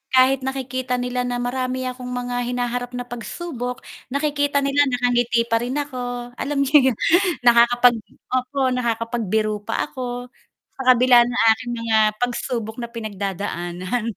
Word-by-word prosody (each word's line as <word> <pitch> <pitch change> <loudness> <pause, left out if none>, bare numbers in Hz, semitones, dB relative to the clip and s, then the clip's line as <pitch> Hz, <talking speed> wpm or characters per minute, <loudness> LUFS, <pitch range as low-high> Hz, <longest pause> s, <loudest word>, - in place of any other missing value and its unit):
kahit 260 +1 +5
nakikita 255 -1 -2
nila 250 0 -2
na 245 0 -2
marami 255 +1 -2
akong 250 0 -6
mga 245 0 -3
hinaharap 245 0 -2
na 245 - -3
pagsubok, 245 +1 -6 0.3
nakikita 285 0 +1
nila 280 +1 +3
nakangiti 245 -2 +1
pa 230 -1 +2
rin 245 +3 -3
ako. 245 -3 -5
Alam 285 0 -2
n'yo 275 +2 -1 0.2
'yun - - -5 0.5
nakakapag 240 0 +5 0.4
opo, 255 +2 -1 0.2
nakakapagbiro 230 -3 -1
pa 225 +7 -2
ako 245 -2 -5 0.5
sa - - -6
kabila 250 -1 +6
ng 240 0 -2 0.2
aking 240 +2 -7
mga 225 -1 +1 0.2
pagsubok 235 -2 -2
na 235 0 -6
pinagdadaanan 195 -2 -4
245 Hz, 135 wpm, -22 LUFS, 235-255 Hz, 0.5 s, kabila